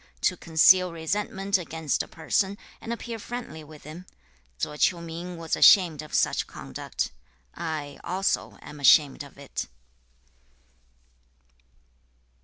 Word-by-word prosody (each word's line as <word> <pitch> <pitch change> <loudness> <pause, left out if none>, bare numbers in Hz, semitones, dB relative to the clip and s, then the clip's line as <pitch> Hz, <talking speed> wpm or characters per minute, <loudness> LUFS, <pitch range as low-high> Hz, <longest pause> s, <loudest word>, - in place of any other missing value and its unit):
To 180 - +2
conceal 180 +2 +5
resentment 195 +3 -1
against 160 -3 -2
a - - -6
person, 190 +4 -1 0.2
and 230 - -6
appear 235 -1 -5
friendly 235 -9 -7
with 150 0 -14
him; 165 +5 -10 0.5
Tso 150 - -3
Ch'iu 170 +3 +2
ming 170 +1 -7
was 165 -1 -2
ashamed 170 -6 +6
of 155 - -7
such - - +1
conduct. - - -5 0.4
I 150 -3 -5
also 190 +3 -1
am 150 - -10
ashamed 140 +1 +5
of 140 -1 -11
it.' 140 -1 -5
165 Hz, 120 wpm, -26 LUFS, 155-190 Hz, 0.5 s, ashamed